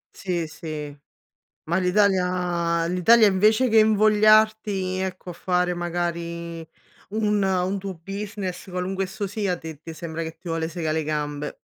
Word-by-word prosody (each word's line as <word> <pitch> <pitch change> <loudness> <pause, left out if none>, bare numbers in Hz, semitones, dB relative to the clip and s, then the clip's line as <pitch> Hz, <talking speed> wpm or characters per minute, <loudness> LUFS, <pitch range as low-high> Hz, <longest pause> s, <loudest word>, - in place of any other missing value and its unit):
Sì, 175 -4 -2
sì, 155 -2 -7 0.7
ma 170 +3 0
l'Italia 180 -3 +1
l'Italia 210 +6 +5
invece 215 +6 +4
che 225 -1 +4
invogliarti, 215 -2 +4
ecco, 185 -1 -4
a - - -5
fare 180 +1 0
magari 170 -1 -4 0.4
un 210 -1 +1
un 190 +1 0
tuo 195 0 -5
business, 195 +1 -6
qualunque 185 +1 -2
esso 195 +2 -4
sia, 195 -3 -2
ti 160 -3 -9
ti 165 - -8
sembra 165 0 -5
che 160 0 -5
ti 175 - -11
vuole 165 0 -1
segà 160 -2 -2
le 160 - 0
gambe. 150 -1 -3
180 Hz, 145 wpm, -24 LUFS, 170-200 Hz, 0.7 s, l'Italia